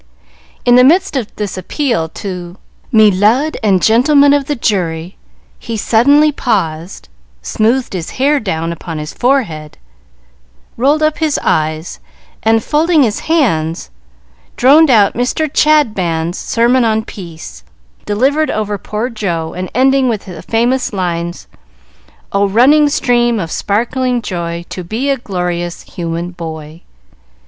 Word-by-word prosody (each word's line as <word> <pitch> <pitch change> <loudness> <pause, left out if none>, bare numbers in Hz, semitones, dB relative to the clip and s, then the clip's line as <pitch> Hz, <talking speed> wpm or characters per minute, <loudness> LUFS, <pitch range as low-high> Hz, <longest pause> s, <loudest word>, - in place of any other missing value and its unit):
In 245 0 +5
the 250 - +6
midst 345 +5 +3
of 250 -6 -1
this 205 -3 -4
appeal 230 - -2
to 180 0 -7 0.3
"Me 215 -2 +5
lud 225 +11 +2
and 195 -4 +2
gentlemen 280 +5 +4
of 285 -1 +1
the 290 - -2
jury," 180 -7 -2 0.4
he 230 -2 -5
suddenly 285 +8 +3
paused, 185 - -3 0.4
smoothed 235 - 0
his 175 -4 -4
hair 285 +3 +2
down 165 -6 -3
upon 165 -1 -7
his 150 0 -6
forehead, 215 - -1 1.0
rolled 285 +6 +1
up 310 0 0
his 315 -3 0
eyes, 155 +1 -1 0.4
and 225 0 +2
folding 315 0 +2
his 220 -4 -1
hands, 170 - 0 0.7
droned 295 +5 +5
out 210 -5 +4
Mr. 250 +6 -1
Chadband's 195 - +1
sermon 240 +2 +2
on 220 -1 0
Peace, 160 - -10 0.4
delivered 275 +9 +1
over 210 -1 -2
poor 210 +5 -3
Jo, 175 -9 -3
and 185 +1 -5
ending 265 0 +3
with 215 -4 -3
the 180 -4 -9
famous 245 +3 0
lines: 175 -2 -3 0.8
"Oh, 200 0 +2
running 285 +8 +4
stream 240 -4 +1
of 165 -4 -4
sparkling 240 +3 -1
joy, 170 -2 -4
To 185 - -6
be 230 +10 -2
a 275 - 0
glorious 175 -5 -4
human 170 0 -5
boy!" 160 -2 -8
215 Hz, 135 wpm, -14 LUFS, 175-260 Hz, 1.0 s, the